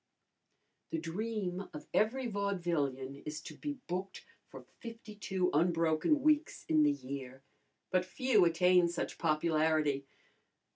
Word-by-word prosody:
The - - -2
dream 190 +2 -3
of 150 - -7
every 245 +5 +2
vaudevillian 170 - -2
is 150 0 -5
to - - -9
be 290 -1 -4
booked 185 +2 -4 0.2
for - - -11
fifty 230 -2 -9
two 190 -3 -1
unbroken 165 - +2
weeks 305 +1 +2
in 155 -1 +4
the 150 -1 +5
year, 135 -1 -7 0.5
but 185 -1 +3
few 220 +2 +3
attain 180 +1 +4
such 175 - -4
popularity. 155 -3 +1
175 Hz, 125 wpm, -33 LUFS, 155-205 Hz, 0.5 s, the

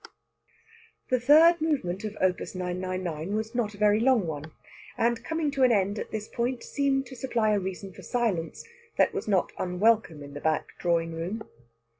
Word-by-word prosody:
The 255 - +3
third 315 +6 +6
movement 220 - -1
of 215 0 -5
Op. 185 -2 +1
999 185 -1 -3
was 220 +2 -3
not 220 -4 -1
a - - -14
very 210 0 +4
long 240 -4 +3
one, 155 -1 -5 0.5
and, 235 0 +1
coming 320 -2 -1
to 275 -1 -2
an 255 -1 +6
end 200 -1 +1
at - - -5
this 215 0 -5
point, 240 +1 -2
seemed 275 -1 0
to 260 - -10
supply 235 -4 0
a 205 - +2
reason 190 0 -6
for - - -12
silence 210 -10 -2 0.3
that - - +3
was - - -4
not 195 -4 +2
unwelcome 180 -3 +1
in 140 0 -10
the 145 - -7
back 155 -1 0
drawing 165 -1 0
room. 180 +7 -4
210 Hz, 180 wpm, -27 LUFS, 180-245 Hz, 0.5 s, third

